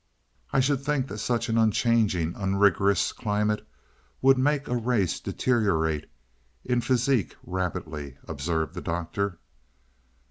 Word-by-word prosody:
"I 135 - +3
should 140 0 +1
think 140 -2 0
that 105 - -6
such 120 0 0
an 115 -1 +1
unchanging, 110 -6 +2
unrigorous 100 0 +2
climate 105 0 -1 0.5
would 135 0 +6
make 145 +1 +1
a 125 - -1
race 115 -6 0
deteriorate 80 - 0 0.6
in 125 -1 +1
physique 125 -3 +1
rapidly," 75 -6 -4
observed 80 +1 -2
the - - -6
Doctor. 85 +3 -2
105 Hz, 115 wpm, -26 LUFS, 85-125 Hz, 0.6 s, would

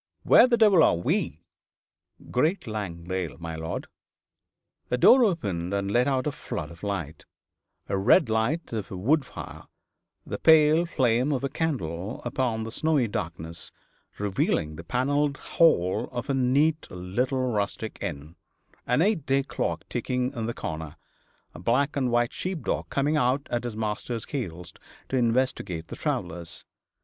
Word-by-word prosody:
Where - - +7
the 240 -2 +3
devil 210 -6 +6
are - - +5
we?' 85 -2 -1 0.9
'Great 155 +10 +1
Langdale, 95 -5 -4
my 85 -1 -6
lord.' 80 0 -4 1.0
A 125 - +1
door 250 - +7
opened 100 - -1
and 100 0 -1
let 120 +4 +3
out 130 -2 +1
a 150 - 0
flood 80 - -6
of 85 +1 -14
light 90 -7 -4 0.6
the 100 - -1
red 130 - +5
light 115 +8 -1
of 105 -3 -3
a 95 - -6
wood 140 - +2
fire, - - -9 0.6
the - - -5
pale 160 +1 +5
flame 130 -2 +2
of 135 -2 -1
a 140 - 0
candle 105 - -3
upon 115 -4 -1
the 115 - -6
snowy 150 -2 +1
darkness, 85 -4 -5 0.5
revealing 95 -6 0
the 80 - -8
panelled 140 - 0
hall 95 - +2
of 120 +3 -3
a - - +1
neat 140 +5 +2
little 125 +8 -1
rustic 105 +1 -3
inn: 75 +4 -5 0.5
an 125 +6 +3
eight 195 -8 0
day 135 0 +2
clock - - -3
ticking 125 +1 -2
in 115 -4 -3
the 120 - -2
corner, 80 0 -5 0.6
a - - -10
black 125 - +1
and 130 -3 +1
white 120 0 +1
sheep 185 -3 -4
dog - - -2
coming 145 +3 +1
out 130 +1 +1
at 120 0 -1
his 115 -3 -4
master's 110 +2 -3
heels 90 - -5 0.4
to - - -1
investigate 115 -9 0
the - - -6
travellers. 85 -1 -4
120 Hz, 155 wpm, -26 LUFS, 90-140 Hz, 1.0 s, Where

